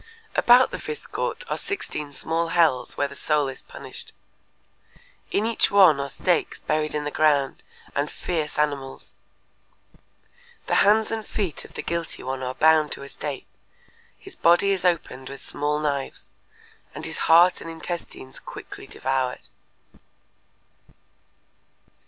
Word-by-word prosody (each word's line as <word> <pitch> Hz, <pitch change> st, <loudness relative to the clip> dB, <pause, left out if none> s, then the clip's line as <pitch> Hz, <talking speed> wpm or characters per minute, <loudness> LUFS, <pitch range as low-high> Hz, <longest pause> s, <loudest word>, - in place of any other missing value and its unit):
About 245 Hz, +2 st, +6 dB
the -, -, -4 dB
fifth 455 Hz, 0 st, -7 dB
court -, -, -2 dB
are -, -, -2 dB
sixteen 150 Hz, -, -4 dB
small 165 Hz, +4 st, -1 dB
hells 160 Hz, -7 st, +2 dB
where 140 Hz, -, +1 dB
the 140 Hz, -, -11 dB
soul 150 Hz, -2 st, +1 dB
is 135 Hz, -1 st, -5 dB
punished. -, -, -8 dB, 1.2 s
In 210 Hz, -, +1 dB
each 230 Hz, -1 st, +2 dB
one 185 Hz, -8 st, +6 dB
are 140 Hz, 0 st, -3 dB
stakes 175 Hz, +4 st, 0 dB
buried 155 Hz, 0 st, -1 dB
in 150 Hz, -, -1 dB
the 150 Hz, -, -3 dB
ground 145 Hz, -3 st, +2 dB, 0.3 s
and 145 Hz, +1 st, 0 dB
fierce 160 Hz, -4 st, -3 dB
animals. 140 Hz, -3 st, -2 dB, 1.5 s
The -, -, -2 dB
hands 215 Hz, +2 st, +4 dB
and 225 Hz, -1 st, -2 dB
feet 195 Hz, -5 st, -3 dB
of -, -, -15 dB
the -, -, -4 dB
guilty 170 Hz, 0 st, -3 dB
one 130 Hz, +1 st, -3 dB
are 130 Hz, 0 st, -3 dB
bound 155 Hz, -1 st, +4 dB
to -, -, -8 dB
a 140 Hz, -, -9 dB
stake, 145 Hz, -1 st, -5 dB, 0.7 s
his 390 Hz, -2 st, -11 dB
body 175 Hz, +4 st, +4 dB
is 190 Hz, -2 st, 0 dB
opened 160 Hz, -7 st, 0 dB
with 135 Hz, -1 st, -10 dB
small 150 Hz, +1 st, -1 dB
knives, 140 Hz, -3 st, -3 dB, 0.7 s
and -, -, -6 dB
his -, -, -5 dB
heart 170 Hz, +3 st, +6 dB
and 165 Hz, -, -7 dB
intestines 165 Hz, -5 st, -6 dB
quickly -, -, -10 dB
devoured. 130 Hz, -1 st, -2 dB
155 Hz, 140 wpm, -24 LUFS, 140-175 Hz, 1.5 s, About